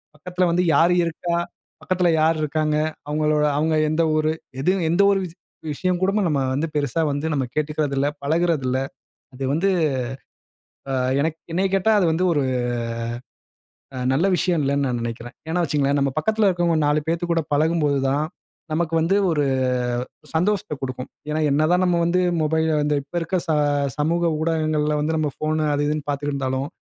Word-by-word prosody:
பக்கத்தில 180 +4 -1
வந்து 175 +1 +2
யார் 170 +4 +5
இருக்கா, 170 +1 -2 0.5
பக்கத்தில 180 -1 +1
யார் 160 +1 +3
இருக்காங்க, 155 0 0 0.3
அவங்களோட 150 0 +1
அவங்க 155 +1 +1
எந்த 155 +2 +1
ஊரு 155 0 +2 0.3
எது, 180 - +3 0.2
எந்த 175 +4 +3
ஒரு 195 - +2 0.5
விஷயம் 180 +4 -1
கூட 190 +1 +2 0.2
நம்ம 145 -3 +1 0.2
வந்து 155 +4 -1
பெருசா 145 +1 0
வந்து 145 +2 -3
நம்ம 140 -2 0
கேட்டுக்கிறதில்லை, 145 -2 0
பழகுறது 160 0 +1
இல்லை, 130 +1 0 0.5
அது 135 - -5
வந்து 175 +6 +2 1.2
ஆ - - -1 0.3
எனக் 160 +2 -1 0.2
-என்னைய 190 +3 +1
கேட்டா, 195 +3 +2
அது 195 - +3
வந்து 170 +3 +1
ஒரு 145 -3 +1 1.5
அ - - -5 0.2
நல்ல 165 +8 +2
விஷயம் 175 -3 +1
இல்லைனு 140 0 +1
நான் 120 -1 -1
நினைக்கிறேன். 120 +1 -6
ஏனா 175 +2 +1
வச்சுக்கங்களேன், 145 -2 +1
நம் 140 0 -1
பக்கத்தில 220 +4 +2
இருக்கிறவங்க 175 -2 +1
4 150 +1 +2
பேத்துக்கூட 170 0 0
பழகும்போது 150 -1 +2
தான், 145 +3 +1 0.5
நமக்கு 165 0 -1
வந்து 170 +5 +2 0.2
ஒரு 150 -3 +1 0.9
சந்தோஷத்தை 195 0 0
கொடுக்கும். 130 -1 -5 0.2
ஏனா, 155 +1 -1
என்ன 155 +2 +3
தான் 180 +1 +3
நம்ப 175 -1 +2
வந்து 180 +2 +2 0.2
மொபைல்ல 155 -2 +1
இப்ப 155 - -14
இருக்கிற 185 +2 -1
ச - - +1 0.5
சமூக 165 +3 +1
ஊடகங்களில 155 -2 0
வந்து 160 +2 0
நம்ப 155 -2 0
ஃபோன் 155 0 0
அது 145 0 0
இதுனு 150 -1 -2
பார்த்துக்கிட்டு 145 0 -2
இருந்தாலும், 130 0 -2
155 Hz, 160 wpm, -22 LUFS, 145-170 Hz, 1.5 s, யார்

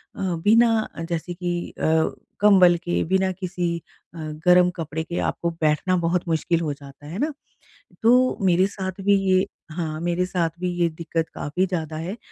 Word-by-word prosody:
अ, - - -11 0.2
बिना 225 0 +4 0.2
जैसे 170 +1 -3
कि 175 -1 -3
अ, 160 0 +2 0.3
कंबल 190 -4 +6
के, 175 0 -1
बिना 190 +2 +1
किसी 180 -2 -3 0.4
अ, - - -11 0.3
गर्म 180 0 +6
कपड़े 160 -1 -4
के 170 +2 -4
आपको 170 - -2
बैठना 155 +4 +2
बहुत 175 +1 0
मुश्किल 165 +1 +1
हो 155 -3 -1
जाता 140 0 -14
है 170 +7 -6
ना? 300 +3 0 0.7
तो 250 +3 +4
मेरे 185 0 +4
साथ 190 -1 -6
भी 200 0 +5
ये 185 0 +4 0.3
हाँ, 155 -1 -3
मेरे 175 +1 0
साथ 180 -3 0
भी 180 0 -1
ये 170 - +4
दिक्कत 165 0 -3
काफ़ी 175 +6 -1
ज़्यादा 160 -4 -3
है। 175 +7 -5
175 Hz, 170 wpm, -23 LUFS, 165-185 Hz, 0.7 s, कंबल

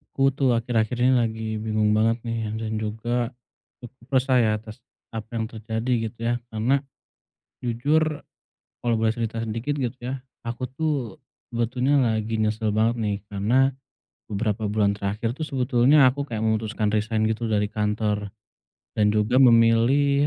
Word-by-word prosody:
Aku 135 0 +3
tuh 135 -2 +2
akhir-akhir 115 0 0
ini 130 - +5
lagi 110 -3 0
bingung 110 -1 +1
banget 115 +2 +2
nih 115 -2 -3
dan 110 -1 -3
juga, 120 +3 -2 0.5
cukup 130 +2 -8
resah 130 0 +3
ya 110 -2 +3
atas 110 +2 -9 0.3
apa 110 -1 -6
yang 115 - 0
terjadi 115 +2 -2
gitu 115 +1 -13
ya 120 +1 +1
karena, 115 +5 +1 0.8
jujur 145 +6 0 0.6
kalau 120 - +2
boleh 110 0 +2
cerita 115 -1 -3
sedikit 115 +5 -2
gitu 130 -1 -2
ya 130 +2 -4 0.2
aku 120 +2 -3
tuh 155 +4 -1 0.6
sebetulnya 125 +4 +1
lagi 110 -2 0
nyesel 110 0 0
banget 110 +3 +2
nih 105 -2 0
karena, 115 +7 +2 0.6
beberapa 105 0 -1
bulan 105 -1 +2
terakhir 105 +3 -2
tuh 155 - -6
sebetulnya 130 0 +4
aku 135 +3 +1
kayak 110 -1 -1
memutuskan 110 0 0
resign 110 +1 +1
gitu 110 +1 -1
dari 105 -1 +2
kantor, 105 -1 -1 0.7
dan 105 0 +3
juga 110 +4 +2
memilih 130 +4 +5
115 Hz, 150 wpm, -24 LUFS, 110-125 Hz, 0.8 s, ini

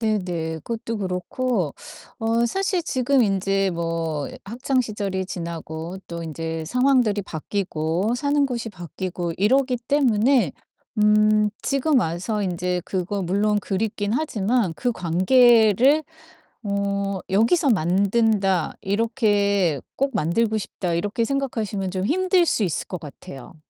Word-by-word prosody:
네네, 180 -7 -1
그것도 230 -1 -4
그렇고 185 - -2 0.5
어 230 +1 +1
사실 380 - -1
지금 260 -2 +2
인제 195 -1 +1
뭐 165 -3 -2 0.2
학창 255 +5 -1
시절이 200 -5 -3
지나고 170 -1 -6
또 170 0 -5
인제 160 0 -4
상황들이 250 - +2
바뀌고 180 +2 -2
사는 285 +2 +1
곳이 235 -4 -3
바뀌고 175 -1 -5
이러기 255 +6 +2
때문에 245 - +3 0.5
음 210 0 +4
지금 275 0 +2
와서 190 +4 -2
인제 180 -1 -1
그거 190 +1 -2
물론 205 +4 +1
그립기는 205 +2 -1
하지만 225 - 0
그 245 - -1
관계를 230 - +4 0.6
어 200 -1 -1
'여기서 235 - +3
만든다.' 195 0 +2
이렇게 200 - +1 0.2
'꼭 275 +1 0
만들고 215 +5 +1
싶다.' 180 -3 -3
이렇게 205 +7 -1
생각하시면 225 -8 -2
좀 185 0 -2
힘들 365 - +2
수 220 - +1
있을 170 -6 -2
것 180 - -4
같아요. 140 0 -11
205 Hz, 260 characters per minute, -23 LUFS, 180-235 Hz, 0.6 s, 음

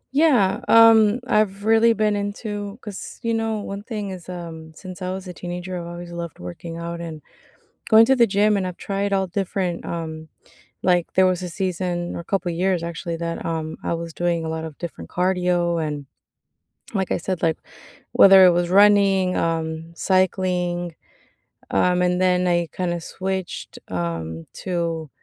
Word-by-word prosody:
Yeah, 260 -11 +4
um, 225 0 +6
I've 205 -3 +1
really 225 +1 +5
been 215 -1 +1
into 205 0 -4
'cause, 205 -3 -8
you 230 0 0
know, 225 -1 -1
one 200 0 -6
thing 210 -3 -5
is, 185 -1 -9
um, 165 -3 -8
since 185 +3 -10
I 185 0 -2
was 190 0 -6
a 180 - -6
teenager, 175 +1 -6
I've 170 - -7
always 175 0 -8
loved 170 -2 -6
working 90 - -8
out 170 0 -5
and 160 -3 -7 0.7
going 220 0 +8
to 265 - +4
the 235 -2 +5
gym, 205 +1 +3
and 190 -2 0
I've 180 - -7
tried 200 0 -2
all 195 -1 +2
different, 185 -1 -2
um, 160 -2 -5 0.5
like 180 -2 +1
there 185 0 +5
was 185 0 0
a 180 - -4
season 175 -1 -2
or - - -4
a - - -13
couple 185 0 -1
years, 180 +1 0
actually, 170 0 -4
that, 170 0 -4
um, 160 -1 -3
I - - -1
was 165 0 -4
doing 170 0 -1
a 160 - -3
lot 160 0 -3
of 160 -2 -7
different 170 -2 -7
cardio. 180 -2 +1
And, 145 -2 -5 0.9
like 190 -2 0
I - - 0
said, 185 0 -3
like, 160 -1 +1 0.5
whether 190 -1 +8
it - - +7
was 175 0 0
running, 195 -2 +5
um, 165 0 -2
cycling, 180 -2 0 0.8
um, 180 0 +2
and 180 0 +1
then 180 -1 +2
I 175 -1 +2
kinda 175 -2 -2
switched, 190 +1 -5
um, 80 -2 -4 0.2
to 170 -3 -2
180 Hz, 175 wpm, -22 LUFS, 170-195 Hz, 0.9 s, going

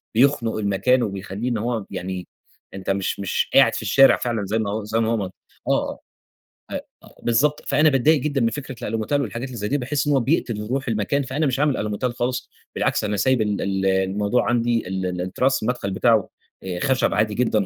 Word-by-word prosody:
بيخنق 120 -2 +3
المكان، 110 +5 +2
وبيخليه 100 +2 -4
إن 120 - 0
هو 115 -1 -2
يعني 95 -1 -5 0.5
أنت 95 -1 -6
مش 100 0 -1
مش 100 -1 -1
قاعد 135 -4 +6
في - - -3
الشارع 135 +6 +5
فعلًا 115 -4 -2
زي 110 +4 -1
ما 110 0 -2
زي 110 +2 -1
ما 115 -1 +1
هو 100 -5 -1 0.4
آه، - - 0 0.7
آه، - - -3 0.2
أ - - -15 0.2
بالضبط، 140 +6 +2
فأنا 155 +1 +4
باتضايق 145 +3 +3
جدًا 140 -1 0
من 115 - +3
فكرة 135 +1 -6
الألوميتال 115 +6 -1
والحاجات 120 +1 -4
اللي 125 -2 -8
زي 105 -1 -2
دي، 145 - +1
باحس 140 +2 -1
إن 145 - +3
هو 135 - +4
بيقتل 115 -5 -1
روح 135 +2 -2
المكان، 115 +6 0
فأنا 135 +4 -1
مش 135 -2 0
عامل 145 -2 +2
ألوميتال 105 +4 -2
خالص، 125 +1 -2 0.3
بالعكس - - 0
أنا 105 0 -1
سايب 130 +4 +2
ال 105 -1 0
ال 95 -1 -1
الموضوع 95 +4 +1
عندي، 120 -3 +1
ال 95 0 -3
ال 90 -1 -2
التراس 130 +9 0
المدخل 110 -4 -1
بتاعه 110 +1 +2 0.3
آآ، 90 -2 -4
خشب 130 +5 +1
عادي 105 0 +1
جدًا 110 -3 +1
115 Hz, 200 wpm, -22 LUFS, 100-130 Hz, 0.7 s, قاعد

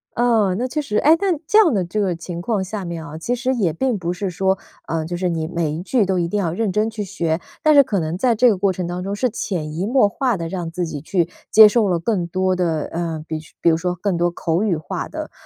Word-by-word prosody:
嗯， 225 -6 +2
那 250 - 0
确 280 +4 -3
实 215 -8 -2
诶， 310 +7 +5
那 385 -3 +1
这 425 - +4
样 390 - +6
的 195 -4 +1
这 175 +5 -3
个 190 -4 0
情 170 +1 -7
况 200 +2 -1
下 195 0 -5
面 170 -2 -5
啊， 150 0 -8
其 200 +10 -2
实 250 +1 -1
也 190 -9 +1
并 260 +1 0
不 175 -2 -2
是 190 +2 -3
说， 190 +2 0 0.3
呃， 165 -1 -1
就 175 +2 -4
是 180 +1 -1
你 165 -2 -2
每 170 -2 -1
一 155 +3 -4
句 225 +3 +1
都 190 -1 0
一 170 - 0
定 205 +4 -1
要 170 -5 -1
认 210 +1 -1
真 210 +3 +1
去 220 -2 -4
学， 170 -4 -2 0.2
但 310 - +5
是 285 - +8
可 210 -7 -1
能 160 0 -2
在 235 +5 +2
这 250 +3 +5
个 225 - +4
过 195 +1 +1
程 185 -1 -4
当 175 +1 -4
中， 200 +1 -3
是 255 +5 +1
潜 160 -8 -3
移 175 +5 -2
默 250 -2 +4
化 245 +1 -1
地 165 -1 -4
让 170 -1 -4
自 175 +1 -3
己 155 -3 -6
去 170 +2 0 0.2
接 215 0 +9
受 215 0 +2
了 180 -2 +1
更 175 -1 -1
多 185 +2 0
的， 165 -4 0
呃， 165 -2 -3
比 160 - -3 0.2
比 - - +3
如 - - +3
说 180 +2 -2
更 185 +1 -1
多 175 +1 +1
口 170 0 -1
语 195 -7 +1
化 155 -2 -5
的， - - -7
185 Hz, 295 characters per minute, -20 LUFS, 170-215 Hz, 0.3 s, 接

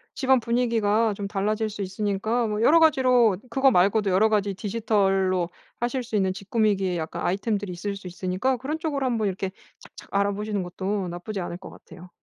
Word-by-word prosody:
집안 265 -2 +3
분위기가 230 -2 +1
좀 200 0 -5
달라질 215 +2 -1
수 205 -1 -5
있으니까 205 +4 -1
뭐 210 0 -2
여러 325 +7 +6
가지로 255 - +4
그거 270 +2 +4
말고도 200 0 +3
여러 205 +4 +4
가지 205 -2 0
디지털로 195 -4 +1 0.3
하실 245 +2 -1
수 230 -2 -5
있는 190 -2 +1
집 200 +1 -11
꾸미기의 200 -5 +1
약간 160 -1 -5
아이템들이 200 +1 -1
있을 200 +3 -4
수 195 -2 -9
있으니까 185 +8 -1
그런 295 +6 -4
쪽으로 290 -5 -2
한번 230 -4 0
이렇게 190 0 -3 0.3
착착 - - -15
알아보시는 200 0 -1
것도 190 +2 -3
나쁘지 180 +4 -5
않을 175 -1 -4
것 185 - -11
같아요. 180 +1 -14
205 Hz, 420 characters per minute, -25 LUFS, 190-230 Hz, 0.3 s, 여러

